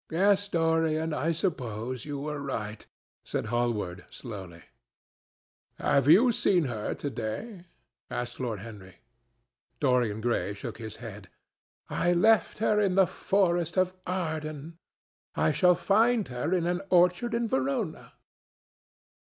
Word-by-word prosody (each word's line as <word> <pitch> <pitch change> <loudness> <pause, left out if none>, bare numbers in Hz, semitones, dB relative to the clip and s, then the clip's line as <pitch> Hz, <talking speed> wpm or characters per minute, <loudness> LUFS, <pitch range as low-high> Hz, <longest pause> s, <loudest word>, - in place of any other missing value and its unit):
"Yes, 200 +4 +3
Dorian, 160 -2 +1
I 150 +3 0
suppose 130 - -3
you 145 -1 -4
were 150 0 -4
right," 110 -6 -5 0.4
said - - -3
Hallward 105 -7 -1
slowly. 95 -8 -9 1.1
"Have 140 0 +2
you 210 +11 +7
seen 185 -6 +2
her 115 -6 -3
to 145 - -4
day?" 175 - -5 0.4
asked 120 0 -4
Lord 115 -6 -3
Henry. 100 -4 -11 0.8
Dorian 125 -6 +2
Gray 110 -3 -1
shook 100 - -7
his 110 -2 -7
head. 105 -5 -10 0.6
"I 175 0 +1
left 210 +3 +3
her 210 -1 +2
in 195 -3 +2
the 190 -1 +6
forest 175 -2 0
of 185 0 +2
Arden; 160 -3 -4 0.6
I 80 +1 +2
shall 180 -1 +4
find 220 +4 +2
her 125 +6 -3
in 180 -2 +1
an 175 +1 0
orchard 180 +6 +3
in 235 0 0
Verona." 255 - -2
155 Hz, 125 wpm, -28 LUFS, 120-185 Hz, 1.1 s, you